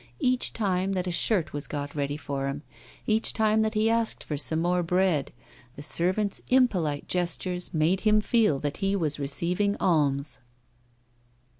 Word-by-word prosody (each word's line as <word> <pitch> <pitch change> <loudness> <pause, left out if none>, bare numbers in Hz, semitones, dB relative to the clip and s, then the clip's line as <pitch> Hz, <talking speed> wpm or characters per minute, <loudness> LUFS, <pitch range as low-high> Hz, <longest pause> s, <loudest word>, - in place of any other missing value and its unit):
Each 255 0 +1
time 195 -3 -1
that 185 -1 -1
a 180 - -2
shirt 175 -1 +1
was 145 0 -4
got 145 -1 -5
ready 145 0 -2
for 140 -2 -4
him, 140 +2 -4 0.4
each 220 0 +2
time 220 0 +2
that 220 0 0
he 215 +1 +2
asked 230 0 +1
for 150 - -4
some 160 +2 0
more 175 +1 +1
bread, 175 -4 +1 0.4
the 145 - -9
servants' 185 +6 0
impolite 185 - +2
gestures 180 0 -2
made 165 +4 +1
him 215 -1 +4
feel 215 - +2
that 145 -1 -3
he 195 0 0
was 155 -6 -2
receiving 175 +8 0
alms. 145 -5 +1
180 Hz, 160 wpm, -27 LUFS, 150-210 Hz, 0.4 s, him